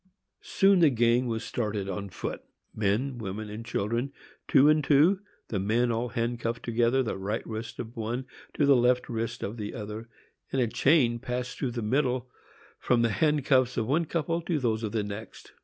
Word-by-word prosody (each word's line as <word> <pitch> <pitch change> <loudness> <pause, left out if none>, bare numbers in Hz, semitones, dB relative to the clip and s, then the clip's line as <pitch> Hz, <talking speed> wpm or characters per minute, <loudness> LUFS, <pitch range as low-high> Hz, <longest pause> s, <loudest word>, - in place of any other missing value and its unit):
Soon 195 -1 +3
the 165 -3 +6
gang 120 0 +2
was 115 -1 -2
started 105 -4 -2
on 100 +1 -4
foot,—men, 110 +7 -3
women 105 0 -5
and 110 +2 -6
children, 120 +3 -2 0.4
two 140 0 +6
and 155 0 +4
two, 155 +8 +4 0.3
the 100 - -1
men 115 +5 +1
all 115 +2 -1
handcuffed 115 -1 -2
together, 120 +3 +2
the 115 - -3
right 105 +4 -3
wrist 115 +1 -6
of 115 -1 -7
one 120 +3 -3 0.3
to 145 - +3
the 140 -1 +6
left 125 0 +2
wrist 115 0 -3
of 105 +4 -4
the 105 -2 -5
other, 110 +1 -6 0.4
and 135 - 0
a 125 - +3
chain 120 0 +3
passing 125 0 -4
through 130 - 0
the 120 -2 -3
middle 125 +1 0 0.5
from 120 -1 +2
the 115 - +3
handcuffs 135 -4 +2
of 110 - +1
one 155 +8 +1
couple 165 +1 -1
to 170 -1 -1
those 115 -5 0
of 110 -2 -3
the 110 -1 0
next. 105 +1 -8
120 Hz, 185 wpm, -28 LUFS, 110-130 Hz, 0.5 s, the